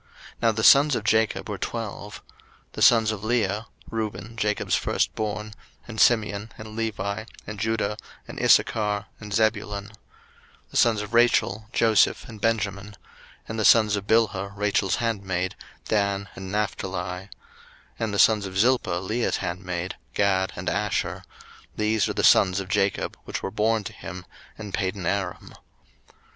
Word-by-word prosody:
Now 115 Hz, -1 st, +4 dB
the 110 Hz, 0 st, -3 dB
sons 140 Hz, +3 st, +7 dB
of 110 Hz, -, -2 dB
Jacob 110 Hz, -3 st, +1 dB
were 105 Hz, -3 st, -5 dB
twelve: 105 Hz, -3 st, -5 dB, 0.5 s
01:035:023 -, -, -41 dB
The -, -, -6 dB
sons 115 Hz, -2 st, +6 dB
of 105 Hz, -1 st, -6 dB
Leah; 110 Hz, -2 st, 0 dB, 0.2 s
Reuben, 110 Hz, +1 st, -4 dB
Jacob's 105 Hz, -2 st, -1 dB
firstborn, 105 Hz, 0 st, -1 dB, 0.3 s
and 110 Hz, -3 st, -2 dB
Simeon, 110 Hz, -2 st, +2 dB
and 110 Hz, 0 st, -9 dB
Levi, 110 Hz, -2 st, -3 dB, 0.2 s
and 105 Hz, 0 st, -7 dB
Judah, 110 Hz, 0 st, -1 dB, 0.3 s
and -, -, -7 dB
Issachar, 105 Hz, -2 st, +3 dB
and 105 Hz, -1 st, -9 dB
Zebulun: 105 Hz, -1 st, 0 dB
01:035:024 -, -, -17 dB, 0.8 s
The -, -, -3 dB
sons 115 Hz, -3 st, +4 dB
of 105 Hz, -, -9 dB
Rachel; 115 Hz, -2 st, +3 dB
Joseph, 110 Hz, -3 st, +3 dB
and 110 Hz, -3 st, -11 dB
Benjamin: 105 Hz, -3 st, 0 dB
01:035:025 105 Hz, -1 st, -13 dB, 0.5 s
And 110 Hz, 0 st, -4 dB
the 110 Hz, -, +1 dB
sons 110 Hz, -2 st, +6 dB
of 100 Hz, 0 st, -5 dB
Bilhah, 105 Hz, -3 st, +1 dB
Rachel's 100 Hz, -2 st, +1 dB
handmaid; 95 Hz, -6 st, -2 dB, 0.3 s
Dan, 100 Hz, -2 st, 0 dB
and 95 Hz, -1 st, -7 dB
Naphtali: 100 Hz, -2 st, -2 dB
01:035:026 90 Hz, +2 st, -5 dB, 0.7 s
And 110 Hz, -2 st, -2 dB
the -, -, -1 dB
sons 105 Hz, -2 st, +5 dB
of 95 Hz, 0 st, -6 dB
Zilpah, 115 Hz, -5 st, +2 dB
Leah's 115 Hz, +5 st, 0 dB
handmaid: 90 Hz, +1 st, -4 dB, 0.2 s
Gad, 95 Hz, -2 st, +2 dB
and -, -, -6 dB
Asher: -, -, -1 dB, 0.5 s
these 110 Hz, 0 st, +1 dB
are -, -, -1 dB
the -, -, -1 dB
sons 95 Hz, 0 st, +5 dB
of 95 Hz, -1 st, -6 dB
Jacob, 100 Hz, 0 st, 0 dB
which -, -, -5 dB
were 95 Hz, -, -3 dB
born 110 Hz, +2 st, +1 dB
to -, -, -7 dB
him 90 Hz, +2 st, -8 dB, 0.3 s
in 105 Hz, -2 st, -7 dB
Padanaram. 95 Hz, -1 st, -2 dB
105 Hz, 155 wpm, -25 LUFS, 100-110 Hz, 0.8 s, sons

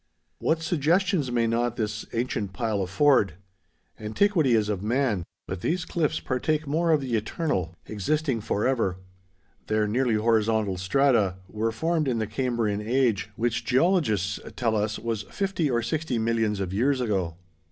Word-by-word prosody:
What 165 Hz, 0 st, 0 dB
suggestions 170 Hz, -2 st, +1 dB
may 120 Hz, -1 st, +2 dB
not 120 Hz, +1 st, 0 dB
this 105 Hz, -2 st, -3 dB
ancient 115 Hz, -5 st, -2 dB
pile 110 Hz, -1 st, -1 dB
afford! 100 Hz, +4 st, +3 dB, 0.7 s
Antiquity 140 Hz, -, +2 dB
is 110 Hz, -2 st, +2 dB
of 105 Hz, -3 st, -2 dB
man; 115 Hz, -3 st, 0 dB, 0.2 s
but 95 Hz, -1 st, -5 dB
these 170 Hz, -, -1 dB
cliffs 160 Hz, -4 st, 0 dB
partake 150 Hz, +4 st, -1 dB
more 160 Hz, +4 st, 0 dB
of 155 Hz, -3 st, +4 dB
the 125 Hz, -3 st, -1 dB
eternal—existing 110 Hz, -, -2 dB
forever. 105 Hz, -3 st, 0 dB, 0.7 s
Their 110 Hz, 0 st, +2 dB
nearly 120 Hz, +1 st, +1 dB
horizontal 110 Hz, -3 st, +2 dB
strata 105 Hz, 0 st, +2 dB
were 110 Hz, +3 st, -1 dB
formed 160 Hz, +5 st, 0 dB
in 125 Hz, -3 st, +1 dB
the 110 Hz, -, 0 dB
Cambrian 110 Hz, -2 st, -1 dB
Age, 115 Hz, -4 st, +1 dB
which 120 Hz, +1 st, -1 dB
geologists 130 Hz, -, +2 dB, 0.2 s
tell 115 Hz, -3 st, 0 dB
us 105 Hz, 0 st, 0 dB
was 115 Hz, -2 st, -3 dB
fifty 190 Hz, -6 st, -1 dB
or 120 Hz, -2 st, +1 dB
sixty 150 Hz, 0 st, -1 dB
millions 110 Hz, -2 st, 0 dB
of 95 Hz, -1 st, -3 dB
years 130 Hz, +6 st, +2 dB
ago. 95 Hz, -9 st, -1 dB
115 Hz, 145 wpm, -26 LUFS, 105-140 Hz, 0.7 s, of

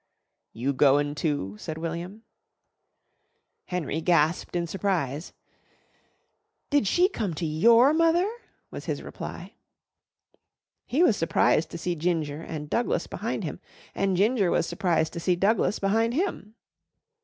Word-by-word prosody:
"You 130 Hz, +5 st, -2 dB
goin' 145 Hz, +1 st, +3 dB
too?" 145 Hz, -, -2 dB
said 160 Hz, -1 st, -6 dB
William. 170 Hz, +6 st, -5 dB, 1.4 s
Henry 165 Hz, -3 st, -3 dB
gasped 165 Hz, 0 st, +1 dB
in 170 Hz, -1 st, 0 dB
surprise. 170 Hz, -5 st, -2 dB, 1.4 s
"Did 285 Hz, -8 st, +3 dB
she 355 Hz, -, +4 dB
come 210 Hz, -, -3 dB
to 165 Hz, -, -3 dB
your 230 Hz, -, +5 dB
mother?" 330 Hz, +3 st, +3 dB, 0.4 s
was -, -, -7 dB
his -, -, -3 dB
reply. -, -, -8 dB, 1.3 s
He 295 Hz, +8 st, +2 dB
was 230 Hz, -, +4 dB
surprised 160 Hz, -1 st, +2 dB
to 170 Hz, -, -7 dB
see 175 Hz, +2 st, -2 dB
Ginger 160 Hz, -3 st, -2 dB
and 155 Hz, -2 st, -6 dB
Douglas 305 Hz, -, 0 dB
behind -, -, -4 dB
him -, -, -5 dB, 0.3 s
and 195 Hz, -2 st, 0 dB
Ginger 205 Hz, -1 st, +3 dB
was 170 Hz, -, +1 dB
surprised 165 Hz, -3 st, 0 dB
to 170 Hz, -, -4 dB
see 180 Hz, +1 st, +1 dB
Douglas 200 Hz, +1 st, +1 dB
behind 225 Hz, +4 st, +1 dB
him. 285 Hz, -, -2 dB
175 Hz, 130 wpm, -26 LUFS, 160-220 Hz, 1.4 s, your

